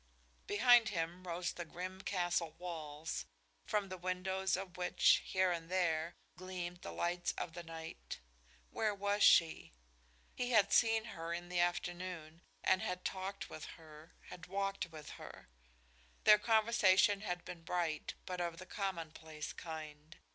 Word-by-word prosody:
Behind 235 +1 +6
him 175 0 -3
rose 175 0 -1
the 175 - -5
grim 185 +3 -6
castle 175 -4 0
walls, 155 - -5 0.4
from 205 -2 0
the 185 0 -6
windows 190 +1 0
of 190 -1 -6
which, 180 0 +4
here 185 -1 +2
and 165 -1 -3
there, 170 -2 +1 0.2
gleamed 180 -1 -5
the - - -6
lights 175 - -1
of 165 - -4
the 175 - -6
night. 160 - -7 0.5
Where 215 -2 0
was 205 +1 0
she? 165 - +5 0.6
He 245 0 -2
had 220 -5 +4
seen 225 -1 +5
her 165 0 -3
in 175 +1 -7
the 180 -1 0
afternoon 175 -2 -2 0.2
and 190 - +4
had 180 0 -3
talked 195 +1 -3
with 155 - -7
her, 155 0 -14
had 180 0 -9
walked 195 0 -1
with 155 -2 -9
her. - - -10 0.7
Their 210 0 +8
conversation 210 -3 +4
had 180 -4 -3
been 170 - -7
bright, 165 -3 -2
but 180 -1 -3
of 170 -1 -2
the 185 - -8
commonplace 160 -6 -4
kind. 155 -1 -8
180 Hz, 145 wpm, -36 LUFS, 165-190 Hz, 0.7 s, Their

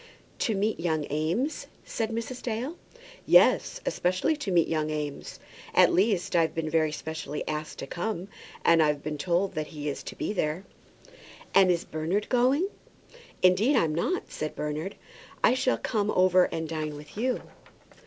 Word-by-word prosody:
"To 220 - +1
meet 210 +3 0
young 160 -3 0
Eames?" 170 - -1 0.2
said 225 -2 -2
Mrs. 230 +2 -4
Dale. 250 +7 -3 0.5
"Yes, - - +5
especially 185 - +1
to 250 -10 -3
meet 170 -2 +4
young 155 -1 -1
Eames. 150 -2 -5 0.4
At - - +6
least, 190 -2 +2
I've 165 -1 +2
been 160 -1 -2
very 155 -2 +2
specially 150 0 -5
asked 155 0 -4
to - - -5
come, 180 +5 -3 0.4
and 165 -1 +6
I've 150 -2 +1
been 150 -1 -4
told 180 +4 +1
that 155 -2 -3
he 150 -2 -6
is 140 - -4
to - - -7
be - - -2
there." 160 -1 -1 0.9
"And 195 -1 +6
is 175 -2 +1
Bernard 165 +7 -2
going?" 260 +8 +3 0.8
"Indeed 200 +10 +5
I'm 165 -10 +2
not," 360 - -1
said 155 0 -4
Bernard. 150 +5 -3 0.5
"I - - +6
shall 255 0 +1
come 210 -3 -1
over 185 -2 +5
and 160 0 -4
dine 155 -2 -3
with 150 0 -12
you." 250 +4 -1
175 Hz, 165 wpm, -27 LUFS, 155-215 Hz, 0.9 s, At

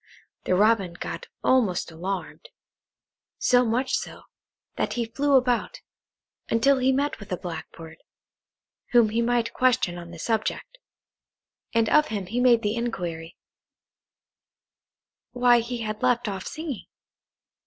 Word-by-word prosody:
The 185 - +2
Robin 205 -3 +3
got 485 - -6 0.2
almost 210 -10 +2
alarmed. 190 - -5 0.9
So 245 0 +4
much 245 +3 0
so, - - -6 0.5
that - - -1
he 240 -1 -1
flew 275 +5 +1
about, 250 -2 +1 0.7
until 265 +4 +3
he 260 +1 +3
met 280 +2 -1
with 205 - -12
a 180 - -1
Blackbird, 160 -1 -8 0.9
whom 235 -3 +6
he 225 +2 0
might 235 -1 0
question 250 -9 +1
on 170 -1 -10
the 170 - -10
subject, 225 - -2 1.0
and 230 -1 +3
of 300 +4 +4
him 205 -3 -3
he 230 +7 -3
made 245 -2 +4
the 210 +1 0
inquiry, 175 -8 -4 2.0
why 245 -1 +5
he 235 +1 -4
had 215 -1 -4
left 245 -2 +2
off 195 -2 -4
singing? 310 -6 -6
230 Hz, 130 wpm, -25 LUFS, 190-250 Hz, 2.0 s, whom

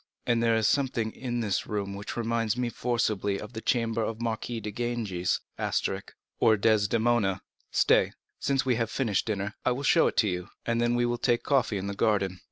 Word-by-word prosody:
And 120 -1 +2
there 115 -1 +3
is 110 -1 +1
something 120 -4 +1
in 120 -1 -3
this 100 -5 -1
room 100 -2 -3
which 100 +3 -6
reminds 115 -1 0
me 125 -1 0
forcibly 110 -5 0
of 105 +3 -9
the 110 - -5
chamber 115 -2 +1
of 110 0 -3
the 120 - -6
Marquise 115 0 -3
de 105 - -4
Ganges10 110 -6 -2 0.4
or 110 -1 +5
Desdemona. 110 -1 +2 0.3
Stay, - - +3 0.3
since 135 -1 +1
we 125 -3 +2
have 115 -1 0
finished 115 -6 0
dinner, 105 -1 -2
I - - +2
will 135 +3 -5
show 165 +3 +5
it - - -3
to 110 - +4
you, 90 0 -3 0.2
and 115 0 +1
then 120 0 +2
we 120 0 +2
will 120 0 -1
take 120 -2 +1
coffee 135 -7 +2
in 95 - -4
the 100 - -3
garden. 100 -3 +1
115 Hz, 200 wpm, -28 LUFS, 105-120 Hz, 0.4 s, or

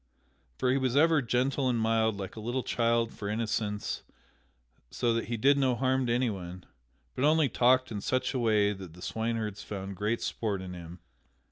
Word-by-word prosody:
For 125 - +1
he 135 - +2
was 130 -1 0
ever 160 +1 +5
gentle 130 +2 +1
and 120 - +1
mild 110 -1 +2
like 95 -2 -6
a - - -7
little 120 +4 -2
child 115 -1 +1
for 100 - -5
innocence 105 -1 -2 0.9
so 120 -1 0
that 115 - -1
he 115 0 -3
did 140 +5 +4
no 130 -2 +2
harm 130 0 +1
to - - 0
anyone, 95 -8 -2 0.5
but 130 - -3
only 155 -1 +4
talked 130 +2 +3
in 105 -2 -4
such 130 +4 0
a 130 - -1
way 105 -3 +3
that 95 -4 -10
the 90 - -14
swineherds 110 -2 -2
found 95 -1 -6
great 105 +5 -1
sport 105 -4 -2
in 95 -1 -7
him. 85 -1 -10
115 Hz, 190 wpm, -29 LUFS, 105-130 Hz, 0.9 s, ever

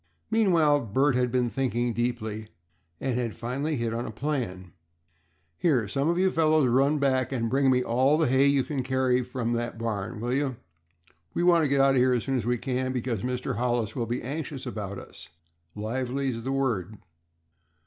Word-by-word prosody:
Meanwhile 170 -10 +4
Bert 135 +7 +2
had 125 -1 +1
been 125 -2 +1
thinking 120 -3 0
deeply, 110 -2 -2 0.5
and 130 -2 -1
had 115 -3 -3
finally 140 +6 -2
hit 115 -3 -2
on 120 +1 -3
a - - -5
plan. 110 - -3 0.9
"Here, 130 - +2
some 140 +8 0
of 170 - +1
you 190 +1 +3
fellows, 155 -3 +3
run 135 +5 +3
back 130 -2 +1
and 115 -4 -1
bring 135 0 +3
me 125 -1 +3
all 130 +6 +3
the 160 - +2
hay 130 +2 +4
you 140 -1 +3
can 140 -1 -3
carry 130 -1 +1
from 120 -1 -3
that 120 -1 -3
barn, 110 -3 -3
will 120 +2 -2
you? 135 -1 0 0.8
We - - +1
want 170 -3 +5
to - - 0
get 140 0 +3
out 135 0 +5
of 135 - +2
here 125 0 +4
as 120 -3 0
soon 135 - -1
as 115 -2 -3
we 120 0 +1
can, 130 +1 -2
because 120 -4 -2
Mr. 125 -4 -3
Hollis 120 -3 0
will 120 -3 -2
be 120 +2 -3
anxious 140 +1 -5
about 105 -5 -5
us. - - -11 0.5
Lively's 125 +3 -2
the 135 - -2
word." 115 -8 -1
125 Hz, 190 wpm, -27 LUFS, 115-140 Hz, 0.9 s, want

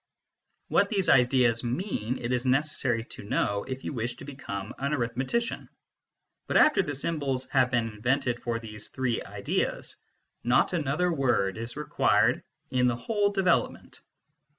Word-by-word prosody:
What - - +3
these 195 -4 +1
ideas 125 -2 +4
mean, 125 - -2
it 120 0 -3
is 125 -1 0
necessary 130 -3 +1
to 115 - -10
know 100 0 0
if 130 0 -6
you - - -4
wish 120 -1 -2
to 135 - -11
become 110 -8 -6
an 140 +2 0
arithmetician. 130 - -2 0.8
But - - +2
after 195 - +4
symbols 140 -3 -2
have 130 -3 +3
been 120 -2 +1
invented 120 +3 -1
for 120 -1 -1
these 105 -2 -7
three 130 -3 -1
ideas, - - -2 0.5
not 120 +8 +3
another 165 +2 +1
word 120 -9 +1
is 115 +3 -6
required 150 - +2 0.3
in 125 -1 +3
the 120 - +1
whole 205 - 0
development. 190 -3 0
130 Hz, 145 wpm, -28 LUFS, 120-145 Hz, 0.8 s, ideas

